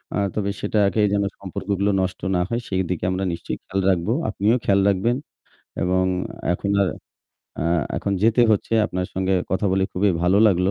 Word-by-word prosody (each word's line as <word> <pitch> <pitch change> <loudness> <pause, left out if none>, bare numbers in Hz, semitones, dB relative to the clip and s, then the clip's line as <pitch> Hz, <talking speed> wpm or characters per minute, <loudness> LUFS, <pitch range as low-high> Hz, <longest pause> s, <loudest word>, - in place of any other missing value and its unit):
আ - - 0 0.2
তবে 100 -2 -1
সেটাকে 105 0 +1
যেন 100 0 +2 0.2
সম্পর্কগুলো 100 +1 -2
নষ্ট 95 0 -3
না 90 - +2
হয়, 120 +1 -1
সেইদিকে 95 -2 -2
আমরা 95 +1 -2
নিশ্চয়ই 65 -6 -5
খেয়াল 95 0 -2
রাখবো। 90 +4 +1 0.2
আপনিও 105 +4 +2
খেয়াল 100 0 +3
রাখবেন। 115 +6 +1 0.7
এবং 95 +1 +2 0.5
এখন 100 +3 -2
আর 95 - +1 0.7
আ - - -1 0.3
এখন 100 - -2
যেতে 115 +2 +4
হচ্ছে। 105 +1 0
আপনার 90 -3 -3
সঙ্গে 95 0 +1 0.2
কথা 95 +3 0
বলে 95 0 +2
খুবই 100 +2 +2
ভালো 90 +3 +4
লাগলো। 90 0 +2
95 Hz, 170 wpm, -22 LUFS, 95-105 Hz, 0.7 s, যেতে